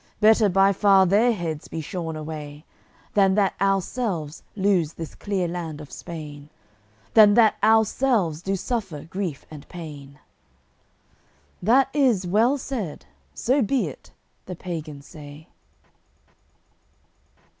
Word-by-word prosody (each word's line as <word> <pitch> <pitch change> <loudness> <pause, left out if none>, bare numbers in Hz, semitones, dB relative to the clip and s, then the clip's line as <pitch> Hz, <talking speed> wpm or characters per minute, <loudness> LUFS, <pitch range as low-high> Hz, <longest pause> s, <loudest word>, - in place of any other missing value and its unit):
Better 215 0 +5
by 195 +1 +4
far 195 -1 +5
their 210 +7 +3
heads 165 -8 -4
be 165 - -6
shorn 160 +1 -5
away, 150 -1 -7 0.5
Than 195 -2 +4
that 200 -2 +2
ourselves 195 - -1
lose 190 -6 +1
this 165 -2 -8
clear 195 -4 -2
land 165 -3 -5
of 150 -1 -11
Spain, 150 -4 -9 0.6
Than 210 -2 +7
that 225 -3 +5
ourselves 220 - +2
do 195 +2 -1
suffer 195 - -4
grief 170 -5 -5
and 150 -2 -11
pain." 145 -5 -10 1.4
"That 245 +8 +4
is 250 -10 +2
well 225 +10 +2
said. 230 - -5 0.3
So 265 +4 +1
be 255 +3 +1
it." - - -14 0.4
the 180 - -5
pagans 155 -5 -7
say. 150 -1 -12
185 Hz, 120 wpm, -24 LUFS, 155-215 Hz, 1.4 s, Than